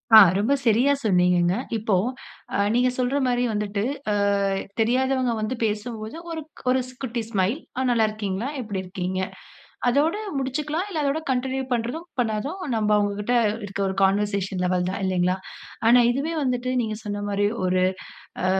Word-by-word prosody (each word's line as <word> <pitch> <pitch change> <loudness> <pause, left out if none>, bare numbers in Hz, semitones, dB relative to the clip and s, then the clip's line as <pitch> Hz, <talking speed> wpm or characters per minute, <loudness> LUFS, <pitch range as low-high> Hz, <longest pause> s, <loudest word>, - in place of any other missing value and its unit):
ஆ - - +13 0.2
ரொம்ப 225 +8 +2
சரியா 245 +6 +4
சொன்னீங்கங்க. 180 -2 +3 0.2
இப்போ 215 -2 +1 0.6
அ - - +2 0.2
நீங்க 250 +1 +4
சொல்ற 255 +2 +1
மாரி 245 -1 +1
வந்துட்டு 205 -1 -1 0.3
ஆ - - +2 0.7
தெரியாதவங்க 255 +2 +2
வந்து 215 +4 -1
பேசும்போது 215 +2 -3
ஒரு 325 -1 -4 0.3
ஒரு 260 +1 +4
ஸ் 255 - -13
குட்டி 240 -3 -2
ஸ்மைல், 195 0 +1 0.2
"ஆ 260 - +1
நல்லாருக்கீங்களா? 215 -2 0
எப்டி 205 -5 -4
இருக்கீங்க?" 185 0 -3 0.7
அதோட 290 +7 +3 0.2
முடிச்சுக்கலாம். 300 +6 -2
இல்ல 325 -6 -2
அதோட 280 +2 +1
கன்டின்யூ 265 +1 0
பண்றதும், 245 +8 -2
பண்ணதாதும் 245 - -1 0.2
நம்ப 215 -1 +1
அவங்கக்கிட்ட 205 +3 0 0.3
இருக்க 200 0 -4
ஒரு 190 - -2
கான்வர்சேஷன் 195 -1 +1
லெவல் 180 0 +1
தான் 190 - -3
இல்லைங்களா? 185 0 +1 0.5
ஆனா 245 +1 +7
இதுவே 280 +6 -2
வந்துட்டு 250 -1 -1
நீங்க 215 -2 -3
சொன்ன 205 -1 -4
மாரி 205 0 +1 0.2
ஒரு 185 0 +2 0.6
ஆ - - +3
220 Hz, 150 wpm, -24 LUFS, 200-255 Hz, 0.7 s, ஆ